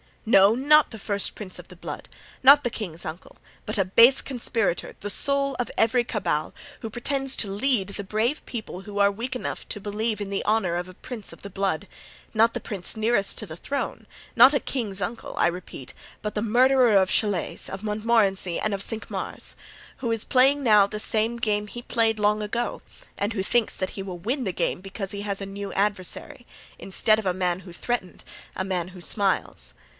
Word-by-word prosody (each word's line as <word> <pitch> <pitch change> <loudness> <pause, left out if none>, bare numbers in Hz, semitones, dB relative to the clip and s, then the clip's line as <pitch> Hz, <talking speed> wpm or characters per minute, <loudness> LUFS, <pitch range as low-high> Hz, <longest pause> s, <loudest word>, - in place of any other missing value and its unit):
"No! 200 -2 +6
not 295 +4 +5
the 225 - -9
first 200 0 -1
prince 195 -4 -5
of 180 - -11
the 180 - -13
blood, 170 - -7 0.4
not 280 +2 +8
the 240 - 0
king's 175 -8 -5
uncle, 160 +2 -8 0.3
but - - -1
the 195 -3 +2
base 230 +8 +6
conspirator, 230 -8 -1
the 205 - -4
soul 280 +4 +3
of 245 - -1
every 230 +2 +3
cabal, 205 -10 -2 0.3
who 225 - -4
pretends 270 +3 -2
to 205 - 0
lead 205 -1 +1
the 200 0 -5
brave 220 +9 -1
people 220 -6 -6
who 205 0 -8
are 200 0 +5
weak 240 +6 -4
enough 250 - -5
to 210 - -4
believe 210 +1 -2
in 205 -1 -4
the 195 - -2
honor 210 -5 +1
of 175 +1 -3
a 185 - -11
prince 230 0 -7
of - - -15
the 200 - -7
blood—not 200 +4 -1
the - - -1
prince 195 -5 -5
nearest 220 -2 +1
to 215 - -4
the 160 -4 -9
throne, 280 +9 -4 0.3
not 250 +3 +9
the 285 - +2
king's 210 -7 -2
uncle, 225 +6 -4
I - - +4
repeat, 175 -6 -6 0.3
but 210 - -3
the 210 - -1
murderer 245 0 +4
of 190 -1 +3
Chalais, 205 -5 +1
of 195 +2 -6
Montmorency 210 -4 +1
and 215 - -1
of 195 - -2
Cinq 225 +1 -4
Mars, - - -3 0.4
who 235 -3 -2
is 225 -1 0
playing 275 +2 +3
now 210 -4 +6
the 210 +1 -5
same 225 +2 +1
game 210 -2 0
he 240 +3 -8
played 225 -2 +1
long 210 +1 +2
ago 235 +3 -2 0.4
and 205 +3 -1
who 195 -3 -1
thinks 235 +2 +1
that 185 - -2
he 195 - -5
will 185 -2 -7
win 250 - -1
the 190 - -1
game 175 - -1
because 195 0 -6
he 200 - -5
has 200 -1 -3
a - - -3
new 200 0 -6
adversary—instead 205 +1 -1
of 215 - -5
a 180 - +2
man 180 -1 -1
who 180 -2 -12
threatened, 235 -1 -4 0.3
a 185 - -2
man 185 -2 -2
who 180 -1 -12
smiles. 190 - -1
210 Hz, 200 wpm, -25 LUFS, 195-235 Hz, 0.4 s, not